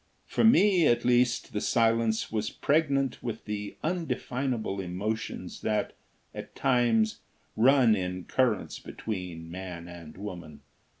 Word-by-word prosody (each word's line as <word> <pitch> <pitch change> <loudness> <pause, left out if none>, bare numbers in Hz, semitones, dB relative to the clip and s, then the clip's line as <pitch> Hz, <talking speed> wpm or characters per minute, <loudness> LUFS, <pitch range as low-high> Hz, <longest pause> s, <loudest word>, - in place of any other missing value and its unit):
For - - 0
me, 200 -7 +5
at 120 0 +2
least, 125 -1 +2
the 105 - -1
silence 115 -1 +1
was 110 -1 -1
pregnant 140 -3 +1
with 115 -2 -5
the 105 -1 -5
undefinable 130 - -2
emotions 100 +5 -4
that, 105 -1 -1 0.4
at - - -9
times, 120 -4 +2 0.4
run 125 -1 +5
in 90 -1 -3
currents 120 -4 0
between 90 -6 -6
man 90 -2 -7
and 85 -3 -11
woman. 90 -6 -8
110 Hz, 120 wpm, -28 LUFS, 95-125 Hz, 0.4 s, me